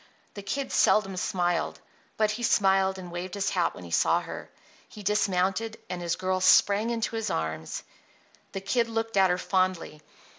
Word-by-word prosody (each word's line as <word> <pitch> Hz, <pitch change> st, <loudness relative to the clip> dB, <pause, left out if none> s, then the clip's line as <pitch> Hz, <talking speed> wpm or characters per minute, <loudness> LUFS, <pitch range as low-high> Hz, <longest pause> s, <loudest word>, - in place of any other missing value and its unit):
The 200 Hz, -, -7 dB
Kid 265 Hz, +8 st, -3 dB
seldom 195 Hz, -3 st, +3 dB
smiled; 175 Hz, -2 st, -1 dB, 0.4 s
but 215 Hz, -1 st, +2 dB
he 225 Hz, +3 st, -5 dB
smiled 190 Hz, -4 st, +3 dB
and 180 Hz, -2 st, -8 dB
waved 175 Hz, +2 st, -5 dB
his 200 Hz, -1 st, -1 dB
hat 175 Hz, -2 st, 0 dB
when -, -, -10 dB
he 85 Hz, -, -10 dB
saw -, -, +3 dB
her. -, -, -8 dB, 0.4 s
He 210 Hz, -, -11 dB
dismounted, 200 Hz, +2 st, 0 dB
and 180 Hz, -1 st, -4 dB
his 170 Hz, -1 st, -1 dB
girl 185 Hz, 0 st, -1 dB
sprang 200 Hz, +4 st, +5 dB
into 230 Hz, -1 st, -2 dB
his 225 Hz, -1 st, -2 dB
arms. 80 Hz, 0 st, -3 dB, 0.7 s
The 195 Hz, -, -4 dB
Kid 230 Hz, +4 st, 0 dB
looked 225 Hz, -1 st, -2 dB
at 190 Hz, -1 st, +5 dB
her 180 Hz, -, +1 dB
fondly. 185 Hz, -4 st, -1 dB
190 Hz, 175 wpm, -27 LUFS, 180-215 Hz, 0.7 s, sprang